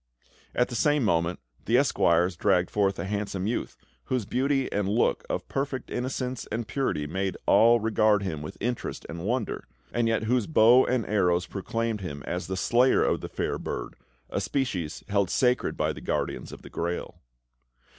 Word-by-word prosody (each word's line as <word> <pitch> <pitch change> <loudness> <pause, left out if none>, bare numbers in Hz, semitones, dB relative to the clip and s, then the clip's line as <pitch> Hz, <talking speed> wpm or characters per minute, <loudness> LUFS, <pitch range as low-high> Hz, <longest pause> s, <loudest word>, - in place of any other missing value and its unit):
At 125 - +2
the 120 - -5
same 150 +3 +2
moment, 85 -3 +1 0.3
the 120 - +3
Esquires 90 -9 +3
dragged 90 0 +2
forth 100 -2 +1
a - - -3
handsome 100 -1 -2
youth, 115 +3 -2 0.3
whose 125 -5 -1
beauty 135 +3 +1
and 100 -1 0
look 110 +4 +2
of - - -3
perfect 135 -1 -3
innocence 125 0 -3
and 110 +1 -2
purity 130 - -1
made 95 +4 -2
all 115 +1 +6
regard 110 -2 +3
him 80 -6 -3
with 75 - -7
interest 120 +2 -3
and 85 0 -6
wonder, 120 0 -2 0.3
and 120 -1 +1
yet 115 -1 +1
whose 120 +1 +1
bow 125 -3 +6
and 125 -4 +1
arrows 90 -4 +2
proclaimed 115 +3 -3
him 70 -6 -6
as 90 +1 -3
the 95 0 -3
slayer 125 +7 +4
of - - +1
the - - -6
fair - - -2
bird, - - -5 0.4
a - - -1
species 95 - -2
held 100 -2 +1
sacred 125 +1 +1
by - - 0
the - - -10
Guardians - - -2
of - - -11
the - - -12
Grail. 85 +1 -4
110 Hz, 175 wpm, -27 LUFS, 95-125 Hz, 0.4 s, all